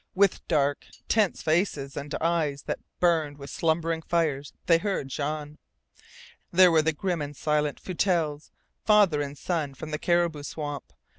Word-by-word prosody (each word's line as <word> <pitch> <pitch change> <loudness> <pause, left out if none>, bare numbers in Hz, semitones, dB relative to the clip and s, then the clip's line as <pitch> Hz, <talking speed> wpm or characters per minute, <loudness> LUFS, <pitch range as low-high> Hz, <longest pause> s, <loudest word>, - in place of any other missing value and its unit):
With 195 0 +2
dark, 145 -3 +1 0.2
tense 215 -4 +1
faces 155 -4 0
and 145 +1 -5
eyes 160 -4 0
that - - -3 0.2
burned 160 -5 +2
with 140 -1 -9
slumbering 165 0 0
fires 155 -4 0
they 165 -1 +5
heard 190 -8 -2
Jean. 150 +1 -4 0.9
There 180 0 +7
were 160 -1 +5
the 160 +1 +1
grim 175 +1 -2
and 145 0 -6
silent 150 -1 0
Foutelles, 165 -5 -1 0.3
father 205 -8 +4
and 145 0 -5
son, 150 -4 -2
from 155 +3 -7
the 150 - -2
Caribou 170 -3 +1
Swamp. 145 - -6
155 Hz, 150 wpm, -27 LUFS, 145-170 Hz, 0.9 s, There